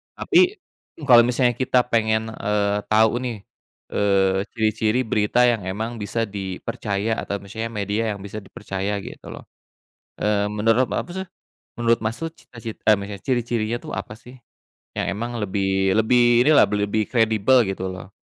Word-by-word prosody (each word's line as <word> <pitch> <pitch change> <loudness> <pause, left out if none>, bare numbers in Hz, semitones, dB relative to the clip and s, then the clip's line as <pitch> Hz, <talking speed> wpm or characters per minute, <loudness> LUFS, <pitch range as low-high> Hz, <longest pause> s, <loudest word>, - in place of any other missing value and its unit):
Tapi 365 +2 +3 0.5
kalau 120 -4 +7
misalnya 125 0 +2
kita 125 -1 +2
pengen, 110 -2 0
eee, 105 -1 0
tau, 110 +2 +3
nih, 120 -5 -5 0.5
eee, 95 -1 +2
ciri-ciri 110 +2 +1
berita 110 +2 +2
yang 115 -6 +2
emang 110 +4 -4
bisa 110 +3 -2
dipercaya 100 +2 -3
atau - - -3
misalnya 110 +3 -5
media 105 0 -2
yang 100 - -11
bisa 105 +1 -6
dipercaya, 100 0 -4
gitu, - - -10
loh. - - -9 0.8
Eee, 105 -1 +1
menurut 115 +3 +2
apa 105 - -3
sih 190 0 -4 0.5
menurut 115 -1 +2
Mas, 110 +2 -2
tuh, 165 0 -4
cita-cit 115 -6 -10
eee, 110 - +5
mis 100 +1 -6
ciri-cirinya, 120 -2 -1
tuh, - - -7
apa, 105 - -6
sih? 125 +2 -14 0.6
Yang - - -2
emang 115 +4 -4
lebih 95 -1 0
lebih 120 +1 +4
ini 155 - +5
lah, - - +8
lebih-lebih 105 +1 0
kredibel, 110 +1 +3
gitu, 95 -1 -3
loh. 95 +1 -10
110 Hz, 155 wpm, -22 LUFS, 100-120 Hz, 0.8 s, lah